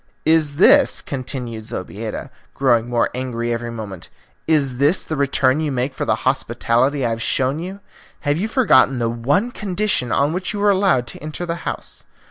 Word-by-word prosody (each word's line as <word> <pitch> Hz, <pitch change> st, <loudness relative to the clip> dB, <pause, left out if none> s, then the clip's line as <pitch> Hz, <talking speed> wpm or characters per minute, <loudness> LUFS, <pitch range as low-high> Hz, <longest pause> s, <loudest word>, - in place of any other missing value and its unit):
"Is 155 Hz, -3 st, +3 dB
this," 170 Hz, -, +5 dB
continued 125 Hz, -4 st, -5 dB
Zobeida, -, -, -6 dB, 0.2 s
growing 120 Hz, -3 st, +2 dB
more 120 Hz, -1 st, +1 dB
angry 120 Hz, -2 st, -2 dB
every 120 Hz, 0 st, -4 dB
moment, 105 Hz, -6 st, -7 dB, 0.4 s
"is 140 Hz, -5 st, +2 dB
this 145 Hz, +7 st, +2 dB
the 155 Hz, -, -4 dB
return 140 Hz, -1 st, +2 dB
you 155 Hz, -2 st, -1 dB
make 130 Hz, +1 st, -1 dB
for -, -, -3 dB
the -, -, +2 dB
hospitality 130 Hz, +4 st, +1 dB
I 115 Hz, -, 0 dB
have 115 Hz, 0 st, -3 dB
shown 130 Hz, +5 st, 0 dB
you? 190 Hz, +4 st, -7 dB, 0.4 s
Have 145 Hz, 0 st, 0 dB
you 200 Hz, +6 st, -1 dB
forgotten 140 Hz, -, +4 dB
the 115 Hz, -1 st, 0 dB
one 145 Hz, -, 0 dB
condition 195 Hz, -, -1 dB
on 145 Hz, +3 st, +2 dB
which 185 Hz, +3 st, -3 dB
you 205 Hz, -, -4 dB
were 205 Hz, 0 st, +4 dB
allowed 190 Hz, -10 st, +2 dB
to -, -, -9 dB
enter 155 Hz, +3 st, -5 dB
the 170 Hz, -, -2 dB, 0.2 s
house? -, -, -7 dB
140 Hz, 180 wpm, -20 LUFS, 120-165 Hz, 0.4 s, this